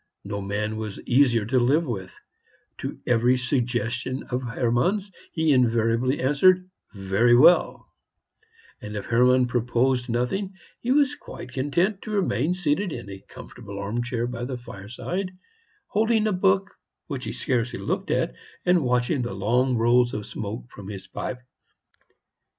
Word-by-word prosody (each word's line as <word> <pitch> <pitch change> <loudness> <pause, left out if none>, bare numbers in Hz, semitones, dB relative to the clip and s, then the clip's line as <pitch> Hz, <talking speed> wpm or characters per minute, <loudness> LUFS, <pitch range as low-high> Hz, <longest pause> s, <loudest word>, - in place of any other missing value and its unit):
No 100 0 -4
man 105 +2 -2
was 110 -2 -5
easier 120 -4 +3
to 130 +4 +2
live 140 +7 +3
with: 95 -8 -6 0.6
to - - -5
every 125 +1 +3
suggestion 125 0 -1
of 125 +1 0
Hermann's 125 - 0 0.2
he 160 -3 +2
invariably 120 +1 +2
answered, 180 +8 +4 0.2
"Very 100 +4 +3
well;" 165 +8 +5 1.0
and 105 0 -7
if 105 - -4
Hermann 125 +2 +4
proposed 125 +1 0
nothing, 185 - -1 0.2
he 240 - -5
was 285 +1 +4
quite - - -10
content 170 +9 0
to - - -8
remain 180 - 0
seated 180 +2 0
in 120 -7 -7
a 95 0 -10
comfortable 100 -1 -10
arm 105 +4 -2
chair 120 -1 -2
by 120 0 -5
the 125 0 -4
fireside, 125 - -6 0.5
holding 220 +1 +1
a 215 - +1
book 190 +1 +2 0.3
which 135 -4 -5
he - - -3
scarcely 125 -2 -1
looked - - -3
at, - - 0 0.3
and 180 -3 +4
watching 125 +2 +1
the 120 -5 -4
long 120 +6 +1
rolls 120 +1 +3
of 105 -1 -4
smoke 110 +3 -6
from 100 -1 -10
his 100 -2 -7
pipe. 125 -1 -6
125 Hz, 145 wpm, -25 LUFS, 115-155 Hz, 1.0 s, well